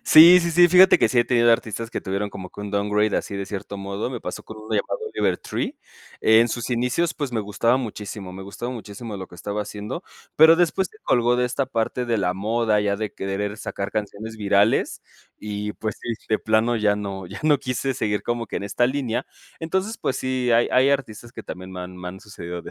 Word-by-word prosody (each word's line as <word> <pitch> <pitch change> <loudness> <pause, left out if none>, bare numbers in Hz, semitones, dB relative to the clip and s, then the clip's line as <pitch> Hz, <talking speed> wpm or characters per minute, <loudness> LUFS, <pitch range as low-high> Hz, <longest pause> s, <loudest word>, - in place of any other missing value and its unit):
Sí, 170 +3 +9
sí, 170 - -1
sí, 175 +1 +6
fíjate 185 +2 +7
que - - +4
sí 125 - +1
he 120 - +5
tenido 120 -2 +4
artistas 115 0 -2
que - - -3
tuvieron 100 +2 -3
como 90 -1 -8
que - - -10
un 105 -1 -5
downgrade 105 +1 +1
así 100 - -3
de 100 0 -4
cierto 100 0 -6
modo, 100 +4 -4
me 120 - -5
pasó 90 - -6
con 110 - -10
uno 110 +1 -12
llamado - - -1
Oliver - - +1
Tree. - - -4 0.4
En 115 +2 +5
sus 120 +2 -4
inicios, 125 +8 0
pues, 140 -5 -4
me 110 - 0
gustaba 110 +4 +1
muchísimo 105 -5 -6
me 95 +1 -8
gustaba 120 +6 -6
muchísimo 110 -1 -7
lo 95 - -6
que - - -14
estaba 105 +4 -3
haciendo, 105 - -6 0.3
pero 160 +1 +8
después 180 +2 +1
se 435 - -20
colgó 120 0 +3
de 125 - +2
esta 130 +2 -1
parte 125 0 -1
de 115 -2 +1
la 90 -2 0
moda, 110 +1 +1
ya 100 -1 0
de 110 -1 -4
querer 100 +2 -3
sacar 100 -2 -4
canciones 110 +1 -4
virales, 100 0 +2 0.4
y 105 0 -4
pues 110 -2 -4
sí, - - -7 0.2
de 110 - +2
plano 110 +2 +2
ya 105 -2 +2
no 100 -2 -5
ya 95 +3 -8
no 150 -3 +4
quise 130 +1 -2
seguir 105 -3 -1
como 120 -1 -2
que - - -5
en - - -3
esta 120 +4 +1
línea. 130 -2 -2 0.3
Entonces, 190 +7 -2
pues 130 - -1
sí, 130 -1 -1
hay 115 +1 +4
hay 130 +2 +5
artistas 120 -4 -3
que - - -8
también 95 +1 -8
me 90 - -6
han 90 0 -8
me 90 0 -6
han 95 +1 -9
sucedido 90 -4 -7
de - - -9
110 Hz, 225 wpm, -23 LUFS, 100-125 Hz, 0.4 s, Sí